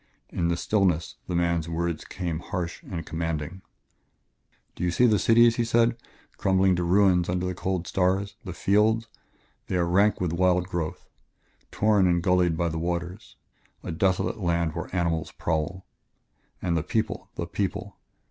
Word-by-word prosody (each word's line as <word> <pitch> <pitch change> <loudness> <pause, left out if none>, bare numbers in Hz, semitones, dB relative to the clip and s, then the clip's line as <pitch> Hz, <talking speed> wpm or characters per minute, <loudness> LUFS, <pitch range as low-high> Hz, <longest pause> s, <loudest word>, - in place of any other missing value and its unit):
In 85 - -1
the 85 0 0
stillness 90 -5 0
the 90 - -2
man's 85 -1 0
words 85 -1 -2
came 85 -4 -4
harsh 90 -1 -4
and 85 -4 -6
commanding 80 +2 -4 1.1
"Do - - -6
you 90 - +2
see 120 +8 +3
the 110 -4 +4
cities," 115 +3 +5
he 120 - +2
said, 115 +1 +3 0.4
"crumbling 95 -1 +3
to 90 - 0
ruins 90 -1 +3
under 90 0 -1
the 90 - -2
cold 90 -1 -2
stars? 95 +2 0
The 95 - -6
fields? 105 +5 +2 0.6
They - - -2
are 90 -1 +2
rank 100 +5 +3
with 90 -3 -1
wild 90 0 +2
growth, 85 -4 -4 0.6
torn 105 -3 +3
and 85 -1 +2
gullied 90 -3 +2
by 85 0 +1
the 80 0 -3
waters; 85 +1 -4 0.5
a - - -4
desolate 95 +5 0
land 85 -3 0
where 85 -1 -5
animals 85 -3 -1
prowl. 85 +3 -2 0.8
And 85 -2 +1
the 85 - +1
people - - -2
the - - -3
people! - - -3
90 Hz, 160 wpm, -26 LUFS, 85-95 Hz, 1.1 s, cities